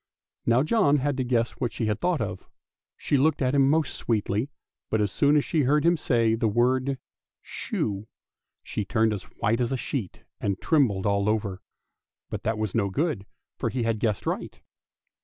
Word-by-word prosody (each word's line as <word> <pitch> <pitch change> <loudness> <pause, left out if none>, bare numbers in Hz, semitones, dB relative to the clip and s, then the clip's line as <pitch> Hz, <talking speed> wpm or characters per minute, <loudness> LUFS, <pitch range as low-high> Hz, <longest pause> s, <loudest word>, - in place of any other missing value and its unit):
Now 120 +3 +4
John 155 -5 +3
had 145 +1 0
to 130 - 0
guess 120 -2 +1
what 120 - -1
she 115 - -2
had 105 -1 -1
thought 175 -5 +1
of. 105 -3 -5 0.5
She 145 - +1
looked 150 +3 +3
at 130 -1 +1
him 135 -1 +4
most 155 -2 +2
sweetly, 110 +2 -1 0.4
but 110 - +1
as 105 -2 +1
soon 145 +6 +3
as 145 - +2
she 160 - +1
heard 145 +3 +2
him 170 +1 +5
say 115 -7 +2
the 115 0 +1
word 130 +5 +2 0.5
shoe, 100 +1 -3 0.6
she 105 - -3
turned 110 +2 +2
as 100 - -5
white 115 +4 -1
as 120 - 0
a 135 - 0
sheet 120 - -4 0.2
and 100 -2 -1
trembled 120 - +2
all 100 0 +2
over; 100 -3 -1 0.7
but - - -3
that 110 0 -1
was 110 -3 -2
no 100 -3 +1
good, 140 - -1 0.3
for - - -1
he 125 -2 -2
had 115 -1 0
guessed 105 -3 -1
aright. - - -3
115 Hz, 190 wpm, -26 LUFS, 105-140 Hz, 0.7 s, him